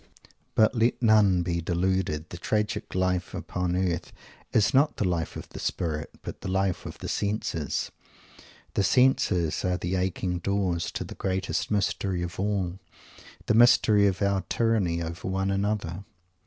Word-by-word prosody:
But 110 0 +4
let 115 0 +2
none 105 -6 +4
be 85 -1 -1
deluded. 85 -2 -1
The 85 - -7
tragic 105 +1 -2
life 90 -1 0
upon 90 -1 -2
earth 90 -2 -1 0.4
is 110 +5 +3
not 140 +3 +3
the 100 - +1
life 85 -2 -2
of - - -7
the - - -9
spirit, 75 -3 -2
but - - -7
the - - -4
life 95 -1 0
of - - -8
the - - -7
senses. 100 -8 -2 0.8
The - - +1
senses 95 -5 +2
are 90 -1 +1
the 90 +1 -3
aching 90 -1 -1
doors 95 -2 -1
to - - -3
the - - -8
greatest 95 +1 -2
mystery 100 -3 0
of 85 0 -6
all, 95 -3 -1 0.7
the - - +2
mystery 110 -3 +6
of 95 0 0
our 100 -1 +2
tyranny 100 -8 +1
over 85 +2 -6
one 95 +1 0
another. 100 -2 -1
95 Hz, 155 wpm, -27 LUFS, 85-100 Hz, 0.8 s, mystery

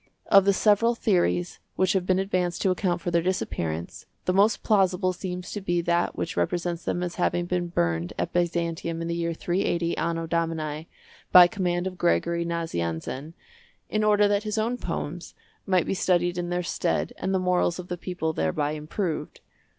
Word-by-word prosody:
Of 195 -2 +7
the 200 - +5
several 220 +4 +3
theories 175 -5 +1 0.2
which 185 -1 +2
have 185 -2 0
been 185 - +3
advanced 185 -3 -1
to 190 - +3
account 180 -1 0
for 175 - -2
their 170 0 +3
disappearance, 85 - -3 0.2
the 180 - +1
most 200 +4 +3
plausible 190 -3 +2
seems 180 0 -6
to 205 - -4
be 175 -2 0
that 170 0 0
which 170 - -3
represents 175 -1 -1
them 175 - -1
as 175 -1 -4
having 175 0 +1
been 175 0 -1
burned 85 - -1
at - - -2
Byzantium 170 -1 -1
in - - -3
the 170 - -1
year 170 0 -2
380 175 -1 0
Anno 165 0 -1
Domini, 160 -2 -2 0.4
by 180 -1 +10
command 175 -1 -1
of 185 -1 -5
Gregory 170 0 +1
Nazianzen, 155 - -3 0.6
in 215 0 +1
order 210 -1 +4
that 205 0 +2
his 215 0 -3
own 225 +3 0
poems 170 0 -5 0.3
might 185 -2 +3
be - - -1
studied 175 -2 +1
in 175 0 -3
their 175 0 -1
stead - - -1
and 190 - -1
the 190 - +2
morals 180 -1 +1
of 180 -1 -7
the 180 - -3
people 175 -2 -3
thereby 145 - 0
improved. 155 +3 -4
175 Hz, 180 wpm, -26 LUFS, 170-185 Hz, 0.6 s, by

